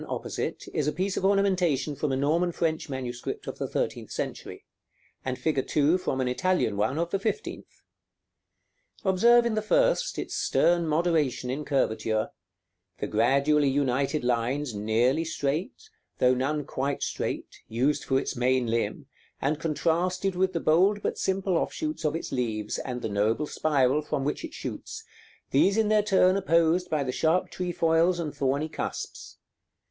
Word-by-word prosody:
opposite, - - -4
is 150 - 0
a - - +2
piece 190 +3 -2
of - - -2
ornamentation 185 -7 +2
from 145 +1 -1
a - - +1
Norman 160 +6 +1
French 160 -2 -1
manuscript 125 -3 -5
of - - -6
the - - -2
thirteenth - - -3
century, - - -5 0.6
and 130 -1 -3
fig. 150 -5 -1
2 155 +5 +3
from 135 - -2
an 130 - 0
Italian 150 - +1
one 105 +8 0
of 170 +1 -1
the 195 - 0
fifteenth. 220 - -5 1.2
Observe 235 +6 +5
in 235 - +1
the 215 - 0
first - - +2
its - - -4
stern 170 -1 +2
moderation 155 -6 +1
in 145 +3 -3
curvature; 110 -6 0 0.7
the - - -3
gradually 140 +6 +3
united 135 +1 0
lines 125 +3 0
nearly 115 +8 +1
straight, 155 +1 -3 0.3
though 125 0 +4
none 140 +3 -1
quite 140 +2 -2
straight, - - -4
used 130 +6 0
for 135 0 +1
its - - -4
main 125 0 +2
limb, 115 +3 -1 0.3
and 145 +2 0
contrasted 175 +4 0
with 185 +1 +1
the 170 - -2
bold 190 +7 +3
but - - -2
simple 190 -1 0
offshoots 310 - -3
of 150 0 0
its 165 - -5
leaves, 110 -4 -2
and 125 -2 -5
the - - 0
noble 110 +7 +1
spiral 145 -2 +1
from 145 -2 -2
which 145 - -2
it - - -7
shoots, - - -6 0.5
these 195 +9 +4
in 220 -1 +2
their 215 -1 +4
turn 190 -2 +4
opposed 170 -1 +2
by 150 -2 0
the 130 - -2
sharp 160 +7 +1
trefoils 170 -1 +1
and 155 -3 -3
thorny 140 +3 0
cusps. 155 - -6
150 Hz, 160 wpm, -27 LUFS, 130-180 Hz, 1.2 s, Observe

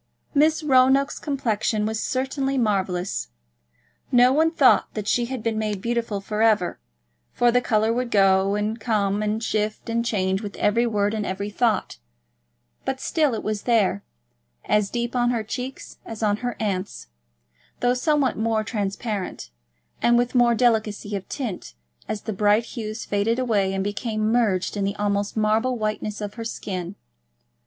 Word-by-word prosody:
Miss 310 +2 +3
Roanoke's 270 0 +4
complexion 220 -6 -1
was 220 0 -2
certainly 270 +1 -1
marvellous. 190 - 0 0.8
No 250 +1 +6
one 320 +3 +4
thought 285 -6 +4
that 210 -2 -4
she 240 +1 +2
had 250 -2 -5
been 225 -1 -1
made 210 -2 -2
beautiful 230 -1 -2
for 210 +2 -3
ever, 215 -6 +2 0.5
for 240 0 +3
the 245 +1 +3
colour 220 -1 +2
would 250 0 -1
go 195 -1 +3
and 210 +2 -2
come 205 -3 0
and 215 +1 -1
shift 215 +1 -2
and 230 0 +1
change 190 -4 0
with 205 -2 -6
every 230 +3 +2
word 205 -2 0
and 215 -1 -2
every 200 +1 -4
thought; 220 -2 0 0.8
but 265 - -2
still 295 -4 +1
it - - -5
was 215 -1 -2
there, 210 - +2 0.6
as 210 -1 +2
deep 240 0 -3
on 240 -1 +2
her 235 -3 0
cheeks 250 +4 -6
as 225 -1 -7
on 205 -1 +2
her 245 +1 -3
aunt's, 200 -3 -3 0.7
though 245 0 +2
somewhat 275 -1 +1
more 220 0 0
transparent, 205 - -4 0.5
and 240 0 +4
with 245 0 +1
more 240 -2 +4
delicacy 215 -3 +1
of 195 - -6
tint 240 - -5 0.3
as 210 - -3
the 220 - -3
bright 210 +3 +3
hues 220 -1 -6
faded 205 +3 0
away 215 -7 +1
and 195 0 -1
became 215 +1 -1
merged 210 -7 +1
in 200 - -1
the 200 +1 -1
almost 205 0 -1
marble 220 +4 +1
whiteness 215 -1 -3
of 205 -1 -4
her 230 - -6
skin. 185 -4 -5
220 Hz, 165 wpm, -24 LUFS, 205-240 Hz, 0.8 s, No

